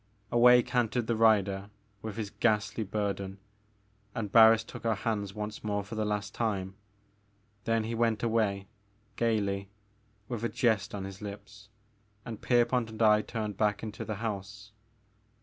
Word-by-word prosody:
Away 125 +1 +7
cantered 120 -1 0
the 115 - 0
rider 100 -3 +3 0.3
with 110 -1 -6
his 105 -3 -4
ghastly 110 0 +1
bur 100 0 -1
den, 95 0 -7 0.8
and 105 -3 -3
Barris 115 0 +7
took - - -10
our 115 -1 +1
hands 100 -1 -2
once 105 0 -5
more 105 -1 -1
for 100 - -10
the 110 -1 -1
last 105 -1 -2
time. 100 -5 -2 0.9
Then 115 -1 +1
he 115 +1 -3
went 115 -1 +1
away, 110 -4 +1 0.5
gaily, 100 -4 0 0.6
with 120 -3 -4
a 115 - +1
jest 110 -4 +1
on 100 - -4
his 95 +1 -8
lips, 100 0 -9 0.6
and 115 -3 -7
Pierpont 120 -1 +2
and 110 +1 -7
I 105 -1 +6
turned 105 -3 -4
back 105 0 +1
into 110 -2 -5
the 110 - -4
house. 100 -1 -5
110 Hz, 155 wpm, -30 LUFS, 100-115 Hz, 0.9 s, Away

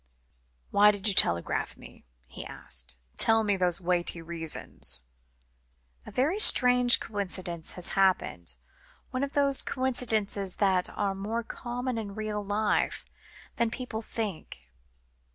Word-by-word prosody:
"Why 205 +1 +5
did 205 0 +2
you 205 - +7
telegraph 85 - +1
to - - -25
me?" - - -16 0.2
he 65 - -10
asked. 60 0 -6 0.2
"Tell 225 0 +4
me 205 -2 0
those 180 -2 0
weighty 175 -1 -2
reasons 160 - -5 0.5
" - - -37
"A - - -9
very 310 +11 -1
strange 250 - +8
coincidence 185 -5 -4
has 180 - -2
happened, 185 - -1 0.6
one 255 +1 -3
of 280 - -5
those 280 -1 +3
coincidences 220 -7 -1
which 190 -3 +1
are 200 -2 -3
more 215 +5 -4
common 245 +1 -5
in 200 -2 -8
real 215 -1 -4
life, 205 +1 -1 0.5
than 235 -1 0
people 230 -2 -6
think. 180 - -7
200 Hz, 135 wpm, -27 LUFS, 170-230 Hz, 0.6 s, strange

